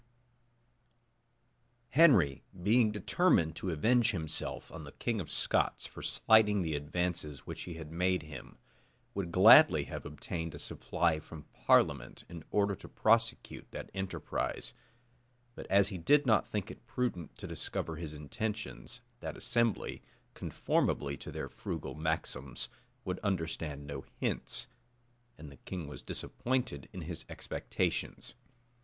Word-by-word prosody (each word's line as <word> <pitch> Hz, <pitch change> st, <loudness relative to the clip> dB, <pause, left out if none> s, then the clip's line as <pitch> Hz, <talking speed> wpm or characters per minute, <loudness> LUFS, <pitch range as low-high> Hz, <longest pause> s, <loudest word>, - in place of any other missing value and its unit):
} 120 Hz, +1 st, -43 dB, 0.3 s
Henry, 120 Hz, -, +6 dB, 0.2 s
being 110 Hz, +4 st, +4 dB
determined 105 Hz, -, +2 dB
to 95 Hz, -, -3 dB
avenge 115 Hz, +9 st, +3 dB
himself 80 Hz, -6 st, -3 dB
on 80 Hz, -1 st, -8 dB
the 70 Hz, -, -10 dB
king 115 Hz, -4 st, -1 dB
of 80 Hz, -, -8 dB
Scots -, -, +1 dB
for -, -, -9 dB
slighting 105 Hz, -3 st, +4 dB
the 80 Hz, -2 st, -1 dB
advances 75 Hz, 0 st, -2 dB
which -, -, -6 dB
he 85 Hz, -, -6 dB
had 80 Hz, -2 st, -8 dB
made 90 Hz, +2 st, +1 dB
him, 75 Hz, -4 st, -10 dB, 0.6 s
would 95 Hz, -4 st, -3 dB
gladly 95 Hz, -, +8 dB
have -, -, -6 dB
obtained 80 Hz, -2 st, -5 dB
a -, -, -6 dB
supply 80 Hz, +2 st, 0 dB
from 80 Hz, -1 st, -10 dB
parliament, -, -, +2 dB
in 85 Hz, -2 st, -8 dB
order 100 Hz, -1 st, +2 dB
to -, -, -12 dB
prosecute -, -, +1 dB
that -, -, -7 dB
enterprise; 95 Hz, 0 st, -3 dB, 0.8 s
but -, -, -9 dB
as 100 Hz, 0 st, +4 dB
he 95 Hz, -4 st, -5 dB
did 145 Hz, -, +4 dB
not 110 Hz, -4 st, +4 dB
think 105 Hz, 0 st, -3 dB
it 120 Hz, -, -14 dB
prudent 115 Hz, -12 st, -2 dB
to -, -, -8 dB
discover 80 Hz, -1 st, -3 dB
his 80 Hz, -2 st, -5 dB
intentions, 110 Hz, -, -5 dB, 0.2 s
that -, -, -5 dB
assembly, 115 Hz, -4 st, 0 dB, 0.3 s
conformably 70 Hz, -1 st, 0 dB
to -, -, -9 dB
their -, -, -4 dB
frugal 65 Hz, -, -5 dB
maxims, 75 Hz, -4 st, -3 dB, 0.4 s
would 90 Hz, 0 st, -2 dB
understand 80 Hz, -7 st, -2 dB
no 70 Hz, -2 st, -6 dB
hints; -, -, -1 dB, 0.7 s
and 75 Hz, -1 st, -10 dB
the 70 Hz, -, -13 dB
king 85 Hz, 0 st, -6 dB
was 75 Hz, -, -8 dB
disappointed 130 Hz, 0 st, -2 dB
in 95 Hz, -, -7 dB
his 85 Hz, +1 st, -5 dB
expectations. -, -, -3 dB
90 Hz, 135 wpm, -33 LUFS, 80-110 Hz, 0.8 s, gladly